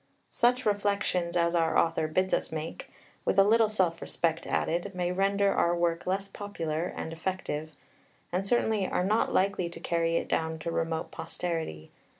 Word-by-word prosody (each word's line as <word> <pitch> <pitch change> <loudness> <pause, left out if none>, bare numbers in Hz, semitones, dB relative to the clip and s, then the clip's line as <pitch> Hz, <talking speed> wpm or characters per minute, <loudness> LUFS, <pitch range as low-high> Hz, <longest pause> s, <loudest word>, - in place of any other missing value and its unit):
Such 250 +1 +2
reflections 200 -4 +1
as 170 0 +2
our 165 -2 +2
author 165 -1 +2
bids 185 +4 0
us - - 0
make, 160 0 -5 0.3
with - - 0
a 195 - +8
little 220 +1 +4
self 180 -6 +1
respect 165 -1 -1
added, 175 +4 -1
may 180 -1 0
render 195 +1 +2
our 170 0 +2
work 170 0 0
less 195 +2 0
popular 170 -6 -3
and 160 - -5
effective, 165 -3 -3 0.6
and 185 +3 -1
certainly 220 -4 +2
are - - 0
not 210 +4 +2
likely 190 -2 +1
to 170 - -9
carry 165 -1 0
it - - 0
down 160 0 -1
to 165 +2 -4
remote 165 -1 -2
posterity. 160 - -4
175 Hz, 165 wpm, -29 LUFS, 165-200 Hz, 0.6 s, a